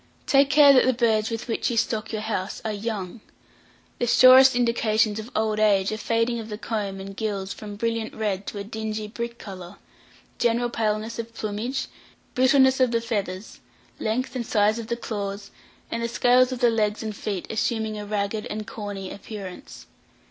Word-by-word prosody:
Take 275 0 +4
care 290 -1 +7
that 255 - +5
the 260 - +4
birds 220 -3 +2
with 230 +1 -5
which 230 - -1
you 235 - -2
stock 220 0 -1
your 215 -1 -3
house 205 -3 -3
are 220 - -1
young. 210 -1 -5 0.8
The 240 - 0
surest 255 +2 +8
indications 225 -3 +1
of 220 +2 -7
old 215 -1 0
age 200 -2 +3
are 215 - -2
fading 230 +2 0
of 225 0 -7
the 210 - -5
comb 205 -4 -3
and 195 +1 -8
gills 200 -3 -3
from 205 -1 -8
brilliant 230 +1 -2
red 205 -3 -2
to - - -5
a 200 - -4
dingy 215 0 -4
brick 235 +2 -5
colour, 185 -3 -9 0.6
general 240 0 +1
paleness 220 0 -2
of 230 0 -6
plumage, 220 +6 -3 0.5
brittleness 265 +1 +4
of 255 -1 +4
the 230 0 +1
feathers, 205 -4 -4 0.4
length 245 +5 -2
and 250 - -1
size 215 +1 +2
of 225 - -6
the 235 - -2
claws, 200 -3 -5 0.4
and 230 - -2
the 235 - 0
scales 250 +2 +3
of 255 -1 -5
the 240 -1 +5
legs 215 -1 0
and 215 -1 -4
feet 200 -3 -4
assuming 220 -1 -1
a - - -5
ragged 210 +1 -2
and 215 0 -5
corny 205 -3 -6
appearance. 200 -2 -9
220 Hz, 185 wpm, -24 LUFS, 210-235 Hz, 0.8 s, surest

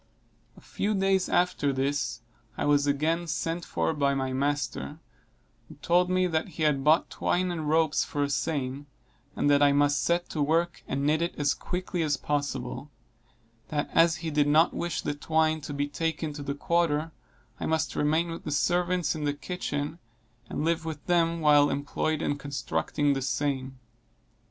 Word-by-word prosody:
A - - -14
few 210 +1 -2
days 195 -1 +2
after 175 -5 +2
this, 135 -2 -1 0.4
I - - -1
was 145 0 +3
again 160 +4 0
sent 165 +2 -2
for - - -1
by 140 -2 +1
my 130 -1 -2
master, 145 +2 -2 0.7
who - - -11
told 180 +1 +2
me 185 0 +2
that 160 -1 0
he 160 - -1
had 145 -3 +2
bought 155 +3 +3
twine 180 0 0
and 160 -3 -3
ropes 160 -1 +3
for 145 - -2
a 140 - -1
seine, 140 -2 -2 0.5
and - - 0
that 145 0 +4
I 145 -1 +5
must 145 0 +2
set 175 +1 +1
to 155 - -3
work 165 +4 +1
and 140 +1 -1
knit 155 +2 +2
it 170 - -1
as 145 -1 +2
quickly 180 -1 -4
as 150 -3 +1
possible; 140 -1 -3 0.8
that 150 -1 -2
as 165 0 +5
he 160 - -2
did 145 -1 +2
not 155 +3 +4
wish 175 0 -3
the - - -1
twine 155 +1 +1
to 145 - -7
be 145 0 -1
taken 160 +1 -2
to 145 - -7
the 140 0 -3
quarter, 165 0 0 0.5
I - - -2
must 160 -1 0
remain 160 +3 +1
with 165 - -7
the - - -5
servants 175 +3 +1
in 155 -2 -5
the 145 0 0
kitchen, 150 0 -4 0.5
and 150 - -2
live 165 0 +1
with 160 -3 -6
them 170 -1 +2
while 145 -1 +5
employed 145 +2 -1
in 145 - -1
constructing 140 - -1
the 135 - -2
seine. 135 -1 -1
150 Hz, 180 wpm, -27 LUFS, 145-165 Hz, 0.8 s, I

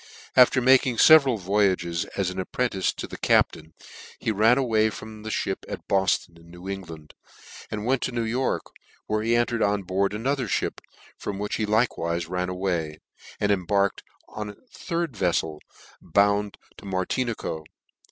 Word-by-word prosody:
After 130 0 +6
making 130 -1 +4
feveral 140 -5 +7
voy 100 +1 +2
ages, 85 -2 -2
as 95 -2 0
an 95 - -6
apprentice 95 0 -1
to - - -6
the - - -9
captain, 80 - +1 0.4
he - - -1
ran 110 +4 +4 0.3
from 110 0 -9
the 110 - -6
(hip - - -2
at - - -7
Bofton 95 -3 0
in 85 0 -18
New 90 +2 -11
England, 80 -6 -7 0.6
and 105 0 -4
went 130 +1 +1
to - - -2
New 120 -1 -1
York, 120 +4 -1 0.4
where 110 0 -1
he 115 +2 +2
entered 120 0 +1
on 100 -1 +1
board 100 +2 0
another 130 +3 -1
Ihip, - - -1 0.4
from 100 - -4
which 105 +1 -3
he 110 - -1
likewife 85 -7 0
ran 90 0 -1
away, 90 -5 -2 0.4
and 105 - +1
embarked 100 +1 +1 0.4
in 105 -1 -4
a 105 - -9 0.2
third 170 -3 -3
veflel, 85 -5 -1 0.4
bound 100 +3 +1 0.2
to - - -13
Mar 95 -1 -1
dnico. 115 -11 -3
100 Hz, 160 wpm, -25 LUFS, 90-115 Hz, 0.6 s, feveral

